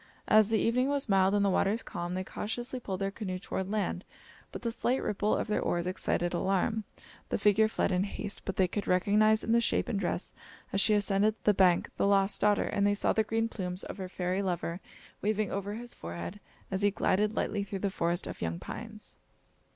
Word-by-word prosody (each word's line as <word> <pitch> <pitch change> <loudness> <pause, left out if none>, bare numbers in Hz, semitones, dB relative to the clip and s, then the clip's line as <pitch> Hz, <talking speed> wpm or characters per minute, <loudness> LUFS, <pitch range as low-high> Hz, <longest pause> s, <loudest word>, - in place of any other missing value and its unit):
As 215 -1 +6
the 225 - +3
evening 250 +4 +2
was 285 -1 -1
mild 195 -1 +4
and 200 -1 +3
the - - +3
waters 200 +4 +1
calm, 175 +1 -4
they 185 - -2
cautiously 240 +6 -4
pulled 195 -5 -5
their 195 0 0
canoe 190 -3 -4
toward 190 0 -4
land, 200 -3 -1 0.5
but - - -7
the 230 - 0
slight 245 +3 0
ripple 210 +1 0
of - - -1
their 210 - 0
oars 175 0 0
excited 180 -1 -1
alarm. 195 +4 0 0.4
The - - 0
figure 210 +1 +4
fled 220 - 0
in 185 +1 +2
haste, 205 0 -5
but 195 - -4
they 185 - +3
could 200 +3 -4
recognise 210 +4 +3
in 225 - -1
the 235 0 +5
shape - - +1
and 205 - -1
dress 180 -1 -2 0.4
as 195 - +3
she 215 0 +4
ascended 205 +1 +2
the 210 - +5
hank, 180 -2 +4
the - - +2
lost 195 0 +2
daughter, 205 0 +4
and 200 0 +1
they 205 - +2
saw - - +1
the 220 - +3
green 225 +1 0
plumes 185 -4 -5
of - - -7
her 190 -2 -5
fairy 185 +1 -1
lover 175 -2 -2 0.4
waving 215 -1 0
over 200 +1 -3
his 240 +1 -8
forehead 85 - -7 0.3
as 190 0 -1
he 205 - +4
glided 205 +2 +1
lightly 205 -1 -1
through 200 0 -5
the 195 0 -1
forest 170 0 -1
of - - -7
young 85 0 -2
pines. - - -8
200 Hz, 215 wpm, -30 LUFS, 185-215 Hz, 0.5 s, As